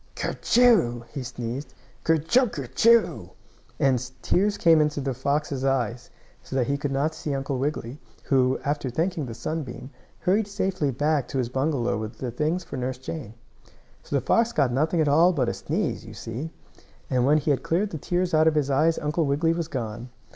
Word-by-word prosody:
"Ker - - -2
chool!" 210 - +4
he 140 - -4
sneezed. 125 +3 -6 0.3
"Ker 165 - +4
chooaker 170 - +1
choo!" 230 0 +3 0.5
and 130 -4 +2
tears 200 +2 +2
came 165 -2 +5
into 150 -1 0
the 135 -1 -2
fox's 140 +1 -1
eyes, 125 -3 -1 0.3
so 130 -1 -1
he 140 +4 0
could 140 0 -3
not 140 +4 0
see 150 -2 -3
Uncle 135 -1 -2
Wiggily, 140 -1 -3 0.2
who, 130 -1 +2
after 145 -2 -1
thanking 160 +2 -1
the 115 - -6
sunbeam, 135 -3 -5 0.3
hurried 200 +3 +2
safely 190 -7 -1
back 145 0 0
to 135 - -4
his 125 -3 0
bungalow 130 -4 0
with 110 +1 -6
the 125 0 -4
things 155 +8 -1
for 165 - -7
Nurse 130 0 -3
Jane. 130 -4 -7 0.7
So - - -4
the 135 - 0
fox 230 0 +3
got 140 - +2
nothing 160 +5 +1
at 155 - +2
all 165 +6 +5
but 130 -7 +1
a - - -1
sneeze, 165 - -2
you 110 -1 -11
see, 120 +9 -5 0.6
and 125 -2 +1
when 145 +4 +4
he 150 0 +1
had 140 - +1
cleared 195 +5 0
the 160 - -5
tears 175 +3 -1
out 155 0 +5
of 160 - +3
his 145 -2 +1
eyes 155 +4 +3
Uncle 150 +1 0
Wiggily 155 +4 +2
was 165 -1 -3
gone. 120 -4 -5
145 Hz, 190 wpm, -25 LUFS, 130-165 Hz, 0.7 s, came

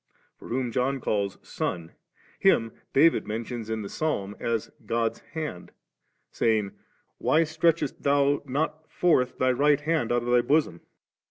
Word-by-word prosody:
For - - -11
whom 125 0 -2
John 135 +3 0
calls 100 -5 -1
Son, 85 -2 -4 0.5
Him 115 0 +3 0.2
David 160 +4 +4
mentions 115 +1 -4
in 110 -1 -2
the - - -5
Psalm 105 -8 -2
as 115 -2 -2
God's 115 0 -1
Hand 155 - -5 0.6
^, - - -29
saying, 110 -3 +1 0.5
'Why 160 - +3
stretchest 160 -2 0
Thou 140 0 +2
not 155 +3 -2
forth 130 -8 +2
Thy 130 0 +3
Right 145 +3 +3
Hand 155 -6 0
out 120 0 +1
of 120 - -2
Thy 120 0 +5
bosom 140 - +1
7?' - - -35
125 Hz, 155 wpm, -26 LUFS, 115-150 Hz, 0.6 s, Thy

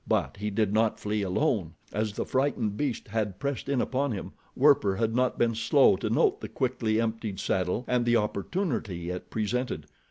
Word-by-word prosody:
But - - 0
he 105 +1 -2
did 105 0 0
not 110 0 +2
flee 105 0 -1
alone. 95 - 0 0.2
As 105 0 -1
the - - -3
frightened 130 -6 0
beast 130 -4 -2
had 105 -3 -2
pressed 140 -1 -3
in 140 -2 +1
upon 135 -1 0
him, 100 - -5 0.2
Werper 130 -9 +4
had 115 +1 0
not 125 0 +1
been 115 -1 +2
slow 115 - +4
to - - -2
note - - +2
the - - -6
quickly 120 -4 0
emptied 115 -3 -2
saddle 95 +6 0
and 125 -1 +2
the 120 0 +3
opportunity 105 - -2
it 90 - -6
presented. 110 - -2
110 Hz, 185 wpm, -28 LUFS, 100-125 Hz, 0.2 s, Werper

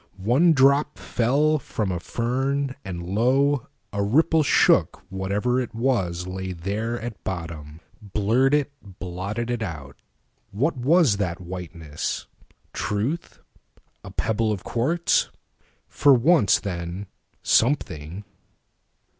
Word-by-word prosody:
One 130 - +4
drop 140 +1 +3
fell 145 +6 +1
from 105 -6 -3
a 90 - -2
fern, 130 +7 -1
and 85 -3 -6
lo, 130 +7 +2 0.3
a 100 - -3
rippleShook 150 +7 +3
whatever 100 +7 0
it 115 -2 -6
was 95 -8 0
lay 95 0 -5
there 105 +7 -3
at 115 -2 -7
bottom, 80 -4 -6 0.2
Blurred 110 +7 +2
it, 145 -1 0 0.3
blotted 100 +6 -4
it 120 -1 -2
out. 75 -9 -6 0.5
What 140 +12 0
was 135 - +3
that 90 -3 -2
whiteness? 85 -4 -5 0.5
Truth? 115 +12 -3 0.6
A - - -9
pebble 110 0 0
of 100 -4 -3
quartz? 155 +9 +1 0.6
For 140 -2 +5
once, 130 - +4
then, 90 0 -5 0.4
something. 95 - +1
110 Hz, 110 wpm, -24 LUFS, 95-135 Hz, 0.6 s, For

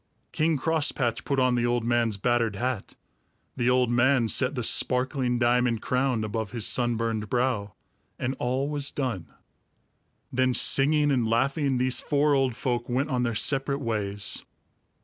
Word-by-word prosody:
King 155 0 +1
Crosspatch 140 -6 0
put 140 -1 0
on 130 -1 +2
the 120 -1 +1
old 120 -1 0
man's 115 -3 0
battered 115 0 0
hat; 120 0 -4 0.6
the 120 0 0
old 125 -1 +2
man 120 -1 +2
set 130 +4 +1
the 125 - -3
sparkling 125 +1 +1
diamond 120 -1 +1
crown 125 -3 0
above 110 0 -3
his 115 -3 -3
sunburned 115 -3 -1
brow, 120 -5 -1 0.4
and 130 +1 -3
all 130 +3 -1
was 145 -1 -2
done. 125 - -4 1.0
Then 130 0 +2
singing 145 +4 +4
and 125 -4 +1
laughing, 135 +4 0
these 130 +1 +2
four 145 0 +1
old 135 -3 +1
folk 120 -2 -3
went 135 +5 -1
on 125 -1 0
their 120 -2 -1
separate 135 +4 +1
ways. 105 -5 -3
125 Hz, 150 wpm, -26 LUFS, 115-135 Hz, 1.0 s, singing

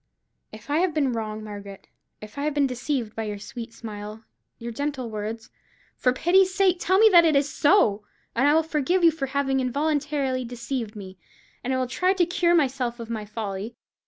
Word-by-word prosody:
If 220 +6 -10
I 300 - +3
have 355 -3 +1
been 275 -5 +1
wrong, 215 -1 -4
Margaret; 200 -2 -9 0.3
if 215 +5 -9
I 285 - -1
have 300 -1 -1
been 285 -1 +3
deceived 250 -3 -3
by 225 - -3
your 210 -1 -4
sweet 225 +3 -8
smile, 215 -1 -8 0.3
your 235 0 -6
gentle 265 -1 -3
words; 220 +2 -5 0.4
for 250 - +2
pity's 365 +8 +3
sake 375 -2 +3
tell 375 +2 +2
me 440 +2 +7
that 345 -4 +7
it 320 -3 +3
is 280 +1 +3
so, 255 - +3 0.3
and 265 +5 +2
I 295 - +5
will 320 - +4
forgive 320 +4 0
you 335 - +7
for 300 -4 -4
having 270 0 0
involuntarily 280 0 -1
deceived 240 -1 -5
me, 190 -2 -10 0.4
and 255 - -2
will 260 0 +1
try 365 +9 +1
to 365 -3 +2
cure 345 0 +2
myself 255 -5 0
of 230 0 -7
my 215 -2 -4
folly. 210 +1 -5
255 Hz, 195 wpm, -25 LUFS, 220-300 Hz, 0.4 s, me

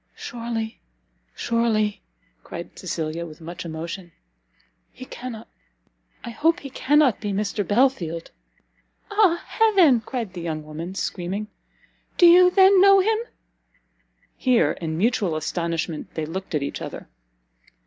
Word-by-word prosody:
"Surely, 230 -2 -5 0.5
surely," 220 -3 0 0.4
cried - - -9
Cecilia, 160 +1 -3
with 155 -2 -10
much 170 +2 -8
emotion, 170 +2 -6 0.8
"he 255 - -11
cannot 240 -3 -8 0.8
I 235 - -6
hope 325 +8 +1
he 275 - -8
cannot 285 -4 +3
be 205 -1 -2
Mr 205 +1 -1
Belfield?" 205 -9 +1 0.8
"Ah 405 -5 +3
Heaven!" 375 - +4
cried 230 -7 -4
the 175 - -6
young 160 -2 -4
woman, 160 +5 -7
screaming, 190 +4 -3 0.7
"do 350 - +6
you 360 +1 +8
then 380 0 +6
know 395 0 +7
him?" 435 +3 +2 1.2
Here, 250 -3 +2
in 160 -2 -4
mutual 200 -4 +1
astonishment, 165 0 -3
they 160 - -2
looked 185 +2 -5
at 145 - 0
each - - -5
other. - - -7
215 Hz, 125 wpm, -23 LUFS, 170-270 Hz, 1.2 s, you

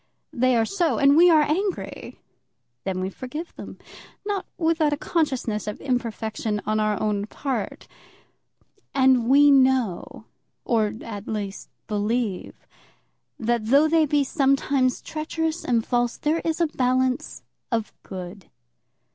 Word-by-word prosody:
They 255 -2 +2
are 225 -1 +3
so, 345 - 0
and 280 0 +5
we 350 +3 +7
are 315 -3 +6
angry. 375 +6 -3 0.7
Then 185 -1 -2
we 190 +1 -3
forgive 300 - -7
them, - - -9 0.5
not 405 -2 -2
without 320 -3 +2
a - - -1
consciousness 260 - -1
of 210 - -4
imperfection 225 -4 -2
on 215 +1 0
our 215 -1 0
own 210 -1 -1
part. 270 +3 -4 1.1
And 260 -3 +4
we 285 +2 +7
know 260 -8 +2 0.4
or, 220 -4 +1
at 205 -2 -7
least, 205 -2 -5 0.2
believe, 210 -1 -2 0.7
that 230 -1 -1
though 280 +6 +5
they 315 -1 +3
be 290 0 +2
sometimes 270 -2 +1
treacherous 320 +1 -3
and 230 -2 +1
false, 240 -1 0
there 310 +2 0
is 325 0 -2
a 340 - +4
balance 255 -3 -1 0.3
of 225 -2 -1
good. 185 +1 -9
255 Hz, 130 wpm, -24 LUFS, 215-300 Hz, 1.1 s, we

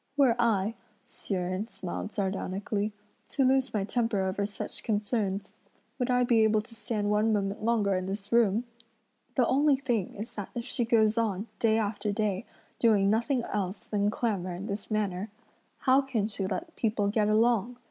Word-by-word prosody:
"Were 265 -5 +5
I," 220 -3 +2 0.3
Hsi 200 - -5
Jen 185 +3 -2
smiled 190 -1 -5
sardonically, 200 +1 -1 0.4
"to 270 - +1
lose 265 0 +3
my 210 -3 0
temper 225 -1 0
over 190 +2 -1
such 205 - -6
concerns, 205 -2 -1 0.5
would 250 - 0
I 250 0 +3
be 235 -2 +4
able 215 0 +3
to 230 +2 -14
stand 210 -2 -2
one 210 +2 +3
moment 200 0 -1
longer 215 -3 +2
in 185 0 -1
this 200 +1 -5
room? 230 -1 +4 0.7
The 250 - +4
only 280 +3 +4
thing 245 -8 -1
is 215 +4 -7
that 205 -2 -5
if 235 -1 -3
she 240 - -1
goes 225 -1 +3
on, 210 -3 0
day 220 -1 +3
after 210 -1 -1
day, 205 -2 -1 0.3
doing 205 -4 +4
nothing 235 +3 +1
else 195 -3 -3
than 205 -1 +1
clamour 195 -6 -1
in 185 +3 -6
this 200 -1 -5
manner, 205 -2 -1 0.5
how 265 +1 +5
can 245 -7 -1
she 200 -3 -2
let 330 - -4
people 215 -3 0
get 210 0 +2
along? 230 +1 +2
215 Hz, 175 wpm, -29 LUFS, 200-235 Hz, 0.7 s, Were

